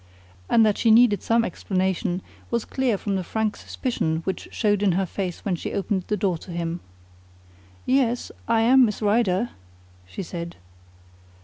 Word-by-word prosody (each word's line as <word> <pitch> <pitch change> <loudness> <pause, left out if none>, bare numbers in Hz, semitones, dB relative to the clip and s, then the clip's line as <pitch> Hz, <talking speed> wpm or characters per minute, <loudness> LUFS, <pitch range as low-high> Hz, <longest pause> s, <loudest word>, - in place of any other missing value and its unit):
And 225 -1 +5
that 210 -2 +1
she 230 - +3
needed 220 -2 +6
some 230 0 +2
explanation 185 0 -1 0.3
was 235 -2 -1
clear 255 -5 0
from 200 0 -2
the 185 - -2
frank 220 +3 -1
suspicion 160 - -2
which 190 - -4
showed 205 -3 +1
in 200 -3 +3
her 190 +2 +1
face 180 -1 -5
when 195 -3 +1
she - - -5
opened 195 -2 -1
the 210 - 0
door 185 -4 0
to - - -13
him. 170 0 -3 1.1
"Yes, 250 -2 +1 0.2
I 230 -1 +3
am 255 +3 +6
Miss 210 -4 0
Rider," 210 0 +2 0.6
she 195 - -6
said. 170 -1 -6
205 Hz, 165 wpm, -24 LUFS, 185-230 Hz, 1.1 s, needed